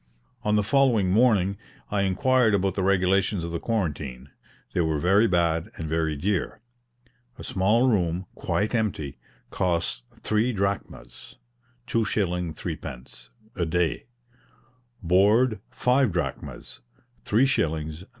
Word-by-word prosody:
On 105 0 +1
the 105 - +2
following 115 -5 +3
morning 100 -3 +3 0.3
I 100 -1 +1
inquired 110 +4 +3
about 95 -1 0
the 95 - -2
regulations 95 0 +2
of 85 - -4
the 85 - -3
quarantine 70 - -3 0.4
they 90 - +1
were 80 -2 0
very 95 +8 +4
bad 85 0 +1
and 80 - -4
very 80 -1 0
dear. 95 +6 -1 0.8
A - - -9
small 105 +7 +2
room, 90 -5 +1
quite 105 +3 -1
empty, 95 - -2 0.3
cost 85 -8 -1 0.2
three 110 +3 +1
drachmas 100 - -4 0.5
(2s. 90 -7 -1
3d.) 60 0 -7 0.3
a 90 - -1
day; 85 +5 -1 1.0
board, 105 +6 +3
five 125 -2 +2
drachmas 70 -7 -5 0.4
(3s. 80 - 0
95 Hz, 115 wpm, -25 LUFS, 85-110 Hz, 1.0 s, very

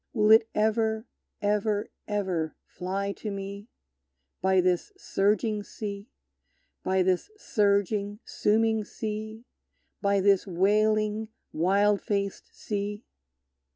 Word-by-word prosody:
Will 215 -3 +4
it 220 0 +7
ever, 220 +1 +1 0.4
ever, 210 0 +1 0.2
ever 185 -6 -1
fly 195 +2 -3
to 210 - -6
me, 200 +1 -6 0.7
By 190 0 +4
this 180 - +1
surging 210 - +1
sea, 205 +1 -6 0.7
By 190 0 +2
this 185 - +1
surging, 205 - +1
sooming 220 +1 +2
sea, 220 +2 -5 0.6
By 200 -1 +3
this 195 0 +3
wailing, 215 +3 +2 0.2
wild 200 +5 +3
faced 200 -1 -2
sea? 205 0 -4
205 Hz, 100 wpm, -28 LUFS, 195-215 Hz, 0.7 s, it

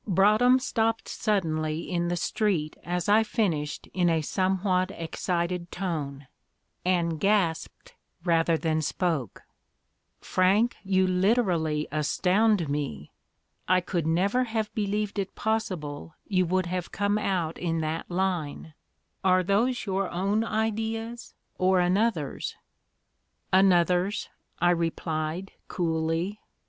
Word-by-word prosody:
Broadhem 215 +7 +5
stopped 225 -3 0
suddenly 160 -7 -1
in 175 -1 -1
the 175 - 0
street 170 -4 0
as 175 +1 -2
I 210 +2 +6
finished 185 -10 -1
in 180 -2 +2
a 165 -1 +2
somewhat 185 +1 +1
excited 170 0 -3
tone, 150 -7 -4 0.6
and 170 -3 +1
gasped 190 -5 0 0.3
rather 165 -1 +3
than 160 -1 0
spoke, 155 - -2 0.8
"Frank, 200 +6 +2
you 190 -1 +2
literally 180 -6 +1
astound 180 +5 +2
me. 140 - -4 0.6
I 185 +1 +4
could 175 -3 -2
never 200 +10 +2
have 220 -2 -2
believed 205 -1 -1
it 195 -1 -4
possible 165 -9 -3
you 185 -3 +2
would 185 +1 +1
have 180 0 -3
come 205 +1 0
out 175 -6 -1
in 165 -2 -1
that 155 +1 -3
line. 175 -4 -2 0.5
Are 185 -1 +4
those 230 +7 +1
your 195 -1 -1
own 200 +5 0
ideas 225 +1 -3 0.2
or 185 0 +4
another's?" 180 -4 0 1.0
"Another's," 185 +1 +3 0.3
I 175 +1 +4
replied, 165 +1 -2 0.2
coolly. 165 +3 -1
185 Hz, 110 wpm, -27 LUFS, 165-205 Hz, 1.0 s, I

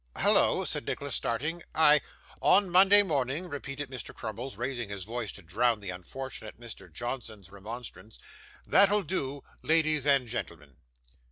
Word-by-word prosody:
'Hallo!' - - +3
said - - -2
Nicholas, 140 -2 -3
starting. 150 +11 -1
'I 150 -1 +6 0.2
' - - -24
'On 195 -1 +4
Monday 195 +3 +7
morning,' 145 0 -1
repeated 145 -2 -6
Mr. 130 - -6
Crummles, 110 +2 -6
raising 120 -2 -3
his 100 -2 -5
voice, 115 0 -4
to 100 - -11
drown 110 +7 +1
the 100 -3 -6
unfortunate 110 +5 -7
Mr. 120 -2 -9
Johnson's 110 -6 -6
remonstrance; 110 +2 -8 0.5
'that'll 200 +1 +4
do, 145 -7 -3 0.2
ladies 155 -3 +2
and 135 -3 +4
gentlemen. 75 - -6
130 Hz, 145 wpm, -29 LUFS, 110-150 Hz, 0.5 s, Monday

